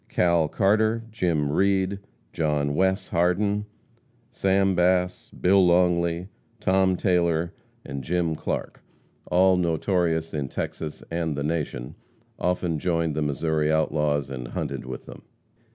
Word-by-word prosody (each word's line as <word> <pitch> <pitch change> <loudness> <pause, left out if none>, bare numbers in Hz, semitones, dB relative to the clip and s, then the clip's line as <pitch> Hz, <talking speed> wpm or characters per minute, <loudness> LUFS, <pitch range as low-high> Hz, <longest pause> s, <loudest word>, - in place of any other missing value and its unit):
Cal 85 -3 +2
Carter, 110 +6 +2
Jim 85 -9 0
Reed, 95 +2 +1 0.3
John 75 -2 0
Wes. 95 +3 +1
Hardin, 100 +4 +1 0.6
Sam 95 0 +2
Bass, 90 0 +1
Bill 95 +1 +3
Longley, 85 0 +2 0.3
Tom 95 -2 +2
Taylor 85 -3 +1 0.3
and 70 0 -5
Jim 85 +2 0
Clark, 80 - -4 0.5
all 95 +1 +4
notorious 85 -1 0
in 75 -3 -2
Texas 75 +3 -5
and 80 -3 -2
the 70 - -2
Nation, 75 -5 -3 0.5
often 90 -3 0
joined 85 -2 0
the 75 - -2
Missouri 75 +1 0
outlaws 75 -3 0
and 60 -2 -5
hunted - - -4
with 65 - -7
them. - - -11
85 Hz, 120 wpm, -25 LUFS, 75-95 Hz, 0.6 s, all